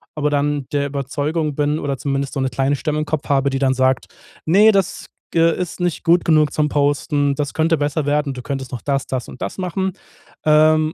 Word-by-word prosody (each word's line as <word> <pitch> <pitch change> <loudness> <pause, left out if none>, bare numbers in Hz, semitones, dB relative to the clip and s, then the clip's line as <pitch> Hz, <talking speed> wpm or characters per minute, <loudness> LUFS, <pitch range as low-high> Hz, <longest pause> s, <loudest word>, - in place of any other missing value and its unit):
aber 150 -1 0
dann 145 -1 0
der 140 -1 +1
Überzeugung 145 +2 -2
bin 150 +1 0
oder 140 -3 -2
zumindest 135 +1 -2
so 135 - -2
’ne 130 - 0
kleine 135 +3 0
Stimme 150 +1 -2
im 155 - -1
Kopf 155 0 -3
habe, 140 -1 +2
die 135 0 -2
dann 135 -1 +2
sagt: 130 0 +1 0.4
„Ne, 205 +7 +6
das 195 -3 0 0.3
ge 165 0 +4
ist 180 0 -4
nicht 175 -2 -1
gut 175 0 +3
genug 155 -3 +4
zum 150 -1 +1
Posten. 145 0 +1
Das 145 0 -3
könnte 165 +1 +2
besser 145 +1 -1
werden. 145 -1 0
Du 125 - -7
könntest 135 0 -5
noch 120 - -4
das, 140 -1 -1
das 125 -4 -4
und - - -12
das - - -4
machen.“ 190 0 -2 0.5
Ähm, 155 +1 +4
145 Hz, 215 wpm, -20 LUFS, 140-155 Hz, 0.5 s, Ne